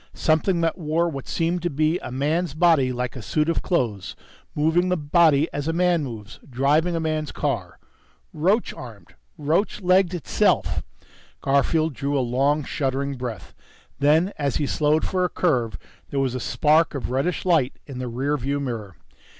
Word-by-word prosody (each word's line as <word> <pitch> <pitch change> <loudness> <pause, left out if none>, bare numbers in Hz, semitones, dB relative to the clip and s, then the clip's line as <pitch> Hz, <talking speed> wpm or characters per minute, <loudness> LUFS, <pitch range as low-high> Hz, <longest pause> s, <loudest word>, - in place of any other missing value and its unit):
_ - - -16
Something 170 +3 +2
that 165 +2 0
wore 165 +1 0
what 140 -5 -6
seemed 170 +1 -1
to 175 - -1
be 155 +3 +1
a - - -7
man's 150 +4 -1
body 155 -6 +4
like 125 0 -3
a 125 - -6
suit 150 +8 0
of 165 - 0
clothes, 115 - -1 0.4
moving 160 +4 +2
the 180 - +1
body 155 -1 +3
as 145 +1 -3
a 165 - 0
man 175 -2 +2
moves, 115 -5 -8
driving 145 +7 +2
a - - 0
man's 155 -2 -2
car... - - -3 0.6
roach 195 +9 +1
armed, 115 -6 -11 0.2
roach 160 +8 0
legged 185 -1 +3
itself! 170 - +1 0.6
Garfield 150 +3 +1
drew 140 +2 -2
a - - +2
long, 140 +4 +1
shuddering 140 0 -2
breath. 125 -4 -6 0.5
Then, 155 +7 +3
as 140 -3 0
he 145 - 0
slowed 150 +2 +1
for 185 -1 0
a 180 - +1
curve, 120 - 0 0.3
there 140 - -2
was 135 -2 0
a 130 - -3
spark 155 +5 +2
of 135 - -4
reddish 145 +9 -1
light 160 -8 +2
in 135 -3 -8
the 130 - -3
rear 135 +5 -1
view 140 +2 -2
mirror. 115 -9 -5
150 Hz, 175 wpm, -23 LUFS, 135-165 Hz, 0.6 s, body